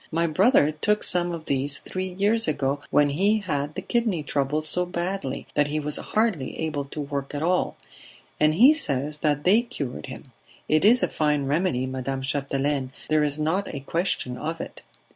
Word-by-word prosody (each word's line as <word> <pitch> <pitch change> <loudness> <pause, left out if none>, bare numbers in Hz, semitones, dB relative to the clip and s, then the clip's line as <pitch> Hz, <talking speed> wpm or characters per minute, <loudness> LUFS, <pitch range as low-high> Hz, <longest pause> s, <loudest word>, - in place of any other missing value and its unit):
"My 165 +1 +1
brother 170 - +4
took 210 +8 0
some 175 -1 +3
of 165 -2 -6
these 140 +1 +1
three 185 0 -5
years 205 +5 +2
ago 140 -2 -1
when 145 -1 +3
he 200 +9 +2
had 150 -5 -3
the - - -5
kidney 225 -10 0
trouble 145 +2 -1
so 180 +4 0
badly 180 -4 -3
that 145 - +2
he 150 +1 -2
was 150 0 -1
hardly 210 - -1
able 150 -3 -2
to 140 - -8
work 140 -1 -4
at 145 - -2
all, 180 +2 0 0.6
and 155 0 +3
he 255 - +7
says 150 - 0
that 145 -2 0
they 205 +6 +5
cured 150 - -6
him. 130 0 -10 0.4
It 155 0 +2
is 235 +5 +5
a - - +3
fine 150 -2 0
remedy, 140 -3 0
Madame 130 +1 -4
Chapdelaine, 140 -1 -1 0.2
there 155 0 +3
is 145 0 0
not 165 +6 -1
a 140 - -6
question 140 -5 -2
of 160 +2 -4
it!" - - -7
155 Hz, 185 wpm, -25 LUFS, 140-180 Hz, 0.6 s, he